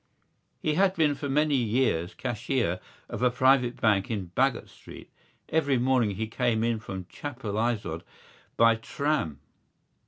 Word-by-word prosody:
He 155 - +1
had 190 +3 +3
been 155 -3 +3
for 145 0 -5
many 150 +2 +2
years 115 -8 +1
cashier 120 -6 -1 0.3
of - - -6
a 125 - +5
private 125 0 +3
bank 100 -3 +2
in 100 -6 -4
Baggot 135 -2 +1
Street. - - -13 0.4
Every 145 -4 +2
morning 120 -5 +2
he 110 +3 -2
came 115 0 0
in 115 -1 0
from 95 -4 -7
Chapelizod 110 - -3 0.6
by 115 0 +5
tram. 140 - -2
120 Hz, 135 wpm, -27 LUFS, 110-135 Hz, 0.6 s, a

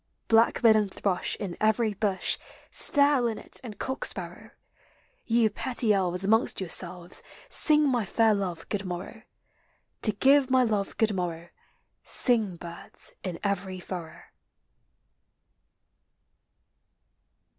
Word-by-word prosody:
Blackbird 225 0 +5
and 210 -3 +1
thrush 185 -2 -2
in 185 -4 -5
every 220 0 +2
bush, 200 -1 -1 0.3
Stare, 285 -3 +4
linnet, 230 -2 -3
and 215 -5 -8
cock 265 +4 -4
sparrow, - - -6 0.8
You 230 -2 +2
petty 235 -1 +1
elves, 180 -1 0
amongst 220 +4 +2
yourselves, 180 -1 -3 0.3
Sing 300 -9 +4
my 245 -4 +1
fair 220 +2 +2
love 180 -5 -3
good 205 -2 -2
morrow. 185 +4 -6 0.8
To 215 - +4
give 270 +5 +4
my 260 0 +4
love 210 -4 -1
good 220 -2 +2
morrow, 170 -2 -4 0.5
Sing, 220 -7 +1
birds, 170 0 -10
in 180 -3 -4
every 195 -2 -2
furrow. 175 -3 -7
205 Hz, 115 wpm, -27 LUFS, 185-235 Hz, 0.8 s, Blackbird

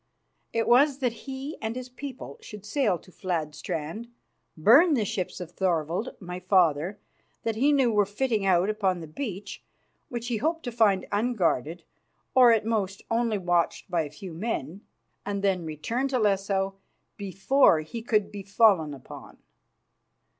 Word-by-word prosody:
It 230 0 0
was 270 +3 +5
that 250 -4 0 0.2
he 270 +3 -5
and 220 +1 -3
his 255 0 -5
people 255 - -8
should 210 -1 -10
sail 215 -5 +1
to 185 - -19
Fladstrand, 165 +3 -4 0.5
burn 280 - +6
the 220 -5 +1
ships 185 -1 -3
of 175 -2 -7
Thorvald, 175 - -1
my 180 -1 -6
father, 180 -1 +2 0.5
that 225 -1 -1
he 275 +6 +3
knew 265 -5 +3
were 205 -2 +3
fitting 215 0 -1
out 185 -1 +3
upon 200 -4 0
the 165 - -7
beach, 195 - -6 0.5
which 240 0 -4
he 235 - 0
hoped 325 +8 -1
to 245 - -4
find 210 -5 +3
unguarded, 180 - 0 0.5
or 250 -2 +7
at 220 -2 +2
most 205 -3 -1
only 230 -2 +1
watched 175 -1 0
by 170 -2 +2
a 150 - -4
few 165 +4 -9
men, 180 - -4 0.4
and 200 -1 -3
then 185 -4 +1
return 195 - -2
to 265 -1 0
Lesso 195 -2 0 0.4
before 195 - +3
he 190 +9 -7
could 215 -3 +1
be 205 - -6
fallen 195 -7 +3
upon. 130 - -12
205 Hz, 155 wpm, -27 LUFS, 180-235 Hz, 0.5 s, or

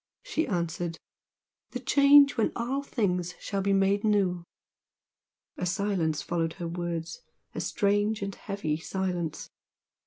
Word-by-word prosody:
she 415 -10 -1
answered 170 -2 -2 0.8
"The - - -3
Change 280 0 +6
when 225 - +1
all 250 +4 -1
things 180 -10 -1
shall 200 -2 -2
be 200 +1 +1
made 195 +1 +2
new!" 195 -5 +2 1.1
A 180 - -2
silence 180 -5 0
followed 165 -1 -1
her 170 +1 -5
words, 170 - -4 0.3
a - - -3
strange 205 +1 +1
and 200 0 -3
heavy 190 -8 -3
silence. 175 -1 -3
195 Hz, 125 wpm, -28 LUFS, 170-210 Hz, 1.1 s, Change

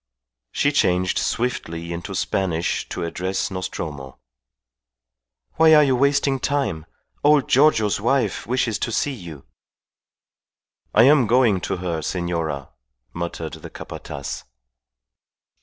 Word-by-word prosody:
She 145 - +1
changed 90 -9 +2
swiftly 85 -9 -2
into 90 +3 -6
Spanish 90 -3 -1
to 90 - -4
address 95 +4 -2
Nostromo. 75 -7 -5 1.4
"Why 160 -1 +7
are 150 - +7
you 135 -3 +2
wasting 140 +1 +2
time? 135 - -1 0.4
Old 145 -2 +4
Giorgio's 120 -8 +3
wife 130 +4 0
wishes 120 -3 0
to - - -2
see 140 +5 0
you." 85 - -10 1.5
"I 110 - +7
am 135 -2 +5
going 115 -5 +3
to 95 - -2
her, 85 -3 -3
senora," 80 -5 -3 0.4
muttered 85 -2 -5
the - - -9
Capataz. 70 0 -7
95 Hz, 110 wpm, -22 LUFS, 85-130 Hz, 1.5 s, Why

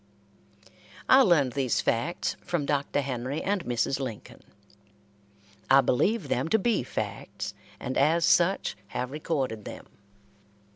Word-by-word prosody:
I 260 +1 +7
learned 165 - +4
these 130 -2 0
facts 125 +10 -1
from 165 -5 -2
Dr. 145 0 0
Henry 130 +2 -3
and 195 -2 0
Mrs. 125 +3 0
Lincoln. 125 -6 -7 1.3
I 135 +1 +7
believe 200 - +1
them - - 0
to 220 - +3
be 220 +1 +1
facts, 125 - -5 0.3
and 130 - -4
as 165 +4 +3
such 180 +3 +2
have 125 +5 -4
recorded 135 -7 -2
them. - - -9
140 Hz, 125 wpm, -27 LUFS, 125-170 Hz, 1.3 s, I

